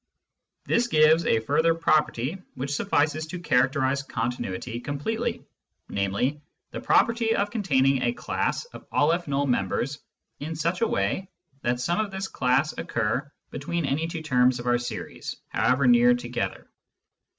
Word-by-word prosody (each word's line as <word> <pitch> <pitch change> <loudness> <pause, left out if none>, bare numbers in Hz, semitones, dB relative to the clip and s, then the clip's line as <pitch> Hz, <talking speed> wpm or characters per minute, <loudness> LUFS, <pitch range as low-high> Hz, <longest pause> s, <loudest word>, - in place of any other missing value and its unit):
This 235 +1 +2
gives 155 -3 +4
a 110 - +3
further 160 +7 +2
property 155 0 +1
which 135 +2 -3
suffices 150 +2 0
to 175 +3 -6
characterise 135 -2 +2
continuity 120 -3 -4
completely, 145 - -3 0.4
namely, 100 +9 -1 0.3
the - - -6
property 230 -1 +3
of 205 +1 0
containing 135 - +2
a - - +2
class 245 - -2
of - - -11
M 145 -3 +1
members 125 +7 -1 0.4
in 155 +3 -5
such 170 +6 -1
a 230 - +3
way 100 - -1 0.3
that 120 0 0
some 170 +9 0
of 215 -1 0
this 190 0 -4
class 135 +2 +1
occur 120 +6 -1 0.2
between 160 +3 -2
any 150 +4 0
two 165 -1 -5
terms 125 -4 +3
of 120 - -7
our 120 0 +2
series, 120 - -6 0.2
however 130 +3 +2
near 120 0 +6
together. 120 0 -4
140 Hz, 140 wpm, -26 LUFS, 125-165 Hz, 0.4 s, near